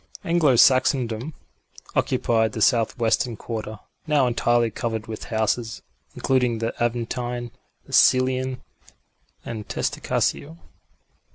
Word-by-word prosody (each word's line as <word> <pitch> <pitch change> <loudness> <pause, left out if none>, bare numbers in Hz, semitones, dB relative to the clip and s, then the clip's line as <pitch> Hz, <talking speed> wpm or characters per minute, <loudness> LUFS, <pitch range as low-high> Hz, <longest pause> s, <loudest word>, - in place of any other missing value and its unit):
Anglo 165 -6 +3
Saxondom 130 +1 +3 0.6
occupied 110 -2 +1
the 110 - -4
southwestern 115 0 +1
quarter, 110 -2 -6 0.3
now 150 -3 +3
entirely 120 -1 +1
covered 115 -2 -3
with 110 -1 -7
houses, 110 +1 -2 0.3
including 125 -3 +1
the 115 +1 -2
Aventine, 120 0 -3 0.3
the - - -13
Celian 130 0 +3 0.8
and 110 -2 -6
Testaccio. 160 +3 -2
120 Hz, 95 wpm, -23 LUFS, 115-130 Hz, 0.8 s, Anglo